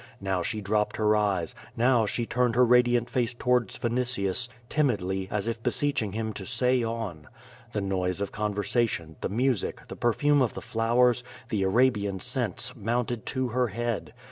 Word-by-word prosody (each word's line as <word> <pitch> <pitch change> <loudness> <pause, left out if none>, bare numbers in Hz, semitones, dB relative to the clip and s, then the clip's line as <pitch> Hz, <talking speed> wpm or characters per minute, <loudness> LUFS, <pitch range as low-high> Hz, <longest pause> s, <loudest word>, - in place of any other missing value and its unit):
Now 95 -2 -1
she 105 +5 -3
dropped 105 +1 0
her 105 0 +3
eyes, 100 -6 0 0.2
now 120 -2 +4
she 120 +3 -1
turned 125 -1 +1
her 125 +1 +6
radiant 120 0 +4
face 120 -1 -1
towards 125 -3 +1
Vinitius, 120 -2 -1 0.2
timidly, 95 -10 0
as 105 +1 -2
if 115 -1 -2
beseeching 125 -4 0
him 110 0 -2
to 100 - -7
say 125 +6 +1
on. 115 -10 -4 0.5
The 105 - -1
noise 95 -1 -1
of 100 - -2
con 105 -1 -2
versation, 105 -6 0
the - - -1
music, 125 0 0
the - - -6
perfume 145 +5 +2
of 125 - +1
the - - -4
flowers, 120 +2 +2 0.3
the 110 -6 0
Arabian 100 -1 +2
scents, - - -2
mounted 120 +1 -2
to 130 -2 -1
her 125 +1 +1
head. 115 +1 -3
115 Hz, 170 wpm, -27 LUFS, 100-125 Hz, 0.5 s, her